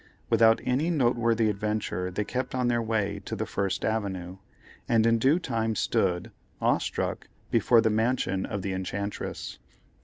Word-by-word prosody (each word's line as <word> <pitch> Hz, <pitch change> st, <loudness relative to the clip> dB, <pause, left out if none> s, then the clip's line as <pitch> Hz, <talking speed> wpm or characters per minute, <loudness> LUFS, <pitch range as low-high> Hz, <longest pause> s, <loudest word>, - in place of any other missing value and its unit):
Without 115 Hz, 0 st, +5 dB
any 140 Hz, +7 st, +1 dB
noteworthy 120 Hz, -6 st, +2 dB
adventure 105 Hz, -3 st, -2 dB
they 100 Hz, +3 st, -2 dB
kept 130 Hz, +4 st, -3 dB
on 125 Hz, -1 st, +1 dB
their 120 Hz, -1 st, +1 dB
way 110 Hz, -3 st, -1 dB
to -, -, -4 dB
the -, -, -2 dB
First 100 Hz, -1 st, -2 dB
Avenue, 95 Hz, -4 st, -2 dB, 0.5 s
and 115 Hz, -1 st, +4 dB
in 115 Hz, 0 st, +3 dB
due 135 Hz, +8 st, +4 dB
time 115 Hz, -10 st, -1 dB
stood, 90 Hz, -2 st, 0 dB, 0.3 s
awe -, -, +3 dB
struck, -, -, -3 dB, 0.2 s
before 115 Hz, -2 st, +5 dB
the 110 Hz, -1 st, +2 dB
mansion 110 Hz, -4 st, 0 dB
of 100 Hz, -2 st, -4 dB
the 95 Hz, -, -2 dB
enchantress. 100 Hz, +2 st, -4 dB
110 Hz, 155 wpm, -27 LUFS, 100-120 Hz, 0.5 s, Without